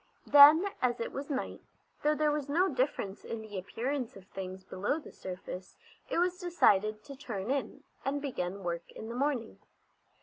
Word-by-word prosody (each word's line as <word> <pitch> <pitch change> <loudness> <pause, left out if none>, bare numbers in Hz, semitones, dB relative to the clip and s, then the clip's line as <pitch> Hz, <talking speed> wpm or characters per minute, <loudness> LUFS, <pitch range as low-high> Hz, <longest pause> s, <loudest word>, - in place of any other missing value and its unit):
Then, 300 +7 +9
as 245 -1 +1
it 230 - -3
was 280 +2 -5
night, 270 -2 -3 0.4
though 300 +1 +3
there 300 0 +2
was 295 -2 -2
no 350 +6 +3
difference 255 -7 -1
in 225 -1 -5
the 210 -1 -9
appearance 245 +6 -3
of 195 -1 -12
things 190 -1 -7
below 195 +9 -1
the 300 - -12
surface, 185 0 -8 0.3
it - - -1
was 360 +1 +1
decided 215 - +3
to 280 - -9
turn 240 -5 -4
in, 275 0 -2 0.2
and 280 +1 0
begin 200 -9 -3
work 170 -1 -4
in 220 - -8
the 235 - -5
morning. 260 -4 -1
250 Hz, 175 wpm, -31 LUFS, 195-290 Hz, 0.4 s, Then